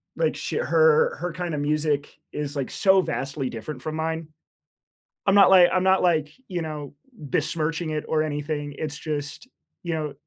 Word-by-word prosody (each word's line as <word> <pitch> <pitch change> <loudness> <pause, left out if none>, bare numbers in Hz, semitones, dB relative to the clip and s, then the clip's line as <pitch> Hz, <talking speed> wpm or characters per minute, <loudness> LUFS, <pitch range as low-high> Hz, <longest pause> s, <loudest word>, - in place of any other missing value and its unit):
like, - - 0
sh - - -5
her 475 0 +3
her 180 -1 -4
kind 175 -1 -4
of 145 - -2
music 150 -1 -1
is, 145 -1 -4
like, 135 -3 -3
so 190 -1 +4
vastly 135 -5 -3
different 125 +4 -7
from 155 0 -4
mine. 160 0 -3 1.0
I'm 195 - +4
not 200 - +8
like 185 -2 +7
I'm 185 - +2
not 190 0 +4
like, 155 -4 +2 0.2
you 180 -2 -3
know, 150 -3 -6 0.2
besmirching 160 - -2
it 150 -1 -3
or 155 -1 +1
anything, 145 -1 -3
it's 150 -1 -3
just, 150 - -5 0.3
you 170 -1 -3
know, 155 -2 -3
155 Hz, 175 wpm, -24 LUFS, 145-180 Hz, 1.0 s, not